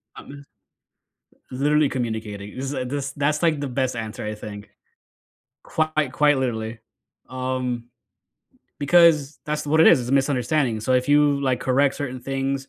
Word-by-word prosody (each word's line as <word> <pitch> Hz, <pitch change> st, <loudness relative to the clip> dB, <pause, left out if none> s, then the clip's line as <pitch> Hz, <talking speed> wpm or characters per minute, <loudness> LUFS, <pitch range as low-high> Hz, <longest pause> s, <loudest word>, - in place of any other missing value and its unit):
Uh, -, -, -10 dB
m 140 Hz, 0 st, -12 dB, 1.1 s
Literally 145 Hz, +3 st, +2 dB
communicating, 110 Hz, -4 st, -5 dB
this, 135 Hz, +1 st, -3 dB
uh 130 Hz, -, -2 dB
this 140 Hz, +1 st, -3 dB
that's, 150 Hz, +1 st, 0 dB
like, 160 Hz, -3 st, +2 dB
the 145 Hz, -, -3 dB
best 130 Hz, 0 st, -1 dB
answer, 110 Hz, -2 st, -5 dB
I 105 Hz, 0 st, -4 dB
think. 105 Hz, -1 st, -9 dB, 0.9 s
Quite 155 Hz, -4 st, -1 dB
quite 145 Hz, -2 st, +3 dB
literally. 115 Hz, -3 st, -3 dB, 0.5 s
Um, 130 Hz, -2 st, -3 dB, 0.9 s
because 155 Hz, -1 st, +4 dB
that's 150 Hz, 0 st, -3 dB
what 155 Hz, +2 st, +3 dB
it -, -, +7 dB
is, 155 Hz, -, +7 dB
it's 120 Hz, -, -5 dB
a -, -, -1 dB
misunderstanding, 135 Hz, -3 st, +1 dB
so 120 Hz, +4 st, -1 dB
if 125 Hz, +1 st, +1 dB
you, 145 Hz, -1 st, +4 dB
like, 130 Hz, -3 st, 0 dB
correct 135 Hz, +2 st, +2 dB
certain 130 Hz, -3 st, -5 dB
things, 135 Hz, +1 st, -3 dB
135 Hz, 155 wpm, -23 LUFS, 125-145 Hz, 1.1 s, it